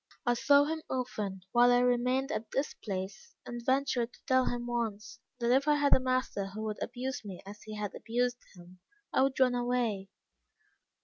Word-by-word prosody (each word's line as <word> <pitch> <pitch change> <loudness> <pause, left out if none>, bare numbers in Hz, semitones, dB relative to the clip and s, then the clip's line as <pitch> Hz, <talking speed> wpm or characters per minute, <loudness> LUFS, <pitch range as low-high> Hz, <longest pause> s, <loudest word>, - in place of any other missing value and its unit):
I 240 - +4
saw 285 +4 +5
him 315 +2 -2
often 210 -7 -3
whilst 245 0 +6
I - - +5
remained 250 +3 +2
at 225 -7 -3
this 275 +2 -1
place, 195 0 -6
and 240 -1 -6
ventured 260 -2 +1
to - - -18
tell 260 -2 +3
him 240 0 -2
once, 230 -4 -3 0.2
that 240 -1 +1
if 270 +3 +3
I 300 - +5
had 290 -1 +3
a - - +7
master 255 -6 -1
who 210 +3 -6
would 215 -1 -4
abuse 255 +1 -4
me 195 -4 -7
as 205 +1 -10
he 215 0 -8
had 210 -1 -4
abused 245 +1 -1 0.2
him, 180 +1 -15 0.3
I - - +4
would 270 0 +1
run 255 -1 +5
away. 240 -5 0
245 Hz, 190 wpm, -31 LUFS, 215-260 Hz, 0.3 s, a